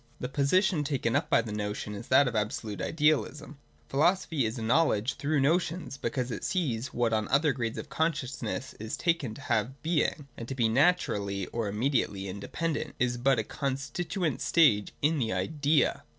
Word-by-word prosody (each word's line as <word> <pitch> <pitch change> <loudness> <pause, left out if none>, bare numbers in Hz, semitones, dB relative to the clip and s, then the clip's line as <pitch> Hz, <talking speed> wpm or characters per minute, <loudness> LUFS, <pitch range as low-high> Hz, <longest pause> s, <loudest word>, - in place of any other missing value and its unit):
The 125 - -3
position 150 +5 +2
taken 135 -5 -1
up - - 0
by 115 - +4
the 110 - -6
notion 105 0 -3
is 105 +3 -8
that 140 - +5
of 125 - -3
absolute 105 -1 -2
idealism. 150 -1 0 0.3
Philosophy 155 -3 +2
is 110 +3 -5
a 115 - -4
knowledge 125 -2 +2
through 145 +1 0
notions 170 +2 0
be 120 - -2
cause 125 +1 -3
it - - -5
sees 130 -11 -1
that - - -9
what 120 -2 +1
on 110 -1 0
other 145 +1 +3
grades 115 -2 -3
of - - -5
consciousness 140 -5 -2
is 110 +1 -4
taken 165 -10 0
to 140 - -11
have 130 +1 -1
Being, 155 -3 0
and 115 - -7
to 135 - -4
be 120 -3 +2
naturally 110 - +1
or 115 -2 -1
immediately 105 -3 0
independent, 145 - -3
is 125 0 0
but 130 +2 +3
a 110 - +1
constituent 145 - -3
stage 115 -12 +4
in 155 +1 +3
the 115 -3 0
Idea. 150 -1 +1
135 Hz, 180 wpm, -29 LUFS, 115-155 Hz, 0.3 s, that